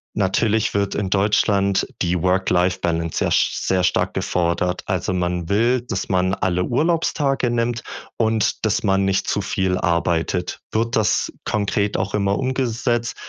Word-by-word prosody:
Natürlich 105 +2 +1
wird 100 -1 0
in 100 -2 -1
Deutschland 100 -1 +2
die 90 0 +1
Work-Life-Balance 90 -2 +1
ja - - +1
s - - +1
sehr 95 -1 +2
stark 90 - +1
gefordert. 90 +1 0
Also, 90 0 -1
man 90 -1 -1
will, 115 +5 +2
dass 95 -6 -4
man 95 0 +1
alle 90 -2 0
Urlaubstage 140 -3 0
nimmt 120 0 -1 0.3
und 110 -1 0
dass 110 - +1
man 95 -1 +2
nicht 95 0 0
zu 105 - 0
viel 95 -1 -1
arbeitet. 85 +1 -1
Wird 115 +2 0
das 110 -2 +1
konkret 100 0 0
auch 95 +2 -2
immer 100 -1 +1
umgesetzt? 120 -2 -1
100 Hz, 145 wpm, -21 LUFS, 90-115 Hz, 0.3 s, Deutschland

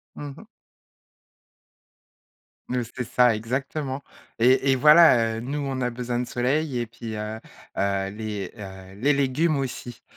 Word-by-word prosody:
Mmh 145 -1 -7
mh. - - -12 2.2
Oui, 125 - -1 0.2
c'est 125 - -2
ça, 125 -1 +3
exactement 135 +4 -3 0.4
et 130 +3 +4
et - - +4
voilà, 150 -6 +6
heu, - - -3
nous, 140 +5 -3
on 135 -2 -3
a 125 - +1
besoin 120 0 -3
de 125 - -1
soleil 130 +3 0
et 120 - -2
puis, 115 -1 -8
heu 105 +1 -5 0.4
heu, 100 0 0
les, 105 -2 -5
heu, 95 -2 -10
les 135 +8 +2
légumes 140 +3 +1
aussi. 125 -3 -5
125 Hz, 150 wpm, -25 LUFS, 110-135 Hz, 2.2 s, voilà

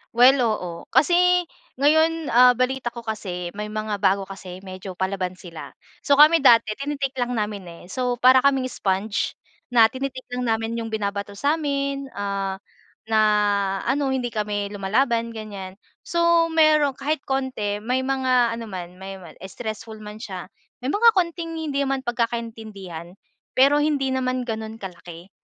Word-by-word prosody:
Well, 255 +3 +7
oo. 215 -7 0 0.2
Kasi 355 +6 +4 0.3
ngayon, 315 +2 +2
ah, 250 +1 +7
balita 255 0 -1
ko 235 -1 -8
kasi 180 -5 -4
may 210 +1 -5
mga 215 -1 -3
bago 195 0 +2
kasi 190 -1 -10
medyo 185 -1 -8
palaban 190 -1 -2
sila. 175 -3 -10 0.3
So, 285 - +5
kami 305 +3 +7
dati 230 -5 +5
tini-take 275 -2 -3
lang 245 0 -1
namin, 210 -4 -3
eh. 170 0 -11
So, 250 +1 -1
para 255 +2 +6
kaming 265 -1 +2
sponge 200 +2 -1 0.3
na 230 -3 +5
tini-take 260 -1 -5
lang 250 0 -2
namin 225 +1 -1
yung 225 - -4
binabato 200 -2 -3
sa'min. 280 0 -1
Ah, 195 -1 -2 0.5
na 220 0 +2 0.7
ano, 275 +1 +1
hindi 250 -3 -2
kami 205 -1 -2
lumalaban 230 +4 +1
ganyan. 200 -3 -8 0.2
So, 340 -1 +3
meron 310 -4 +4
kahit 290 +1 -1
konti 260 -7 -1
may 250 +3 0
mga 255 -3 +2
ano 230 - -6
man 180 -3 -8
may 190 0 -8
man 170 -3 -13
stressful 220 +1 -7
man 210 0 -9
siya, 190 -5 -7 0.3
may 255 - -2
mga 455 +8 +5
konting 335 -3 -1
hindi 295 -4 -2
naman 270 -1 -1
pagkakaintindihan 220 -8 -4 0.4
pero 275 +3 +5
hindi 295 -3 +1
naman 255 -1 -1
gano'n 225 -2 -5
kalaki. 175 -1 -10
235 Hz, 150 wpm, -23 LUFS, 200-270 Hz, 0.7 s, Well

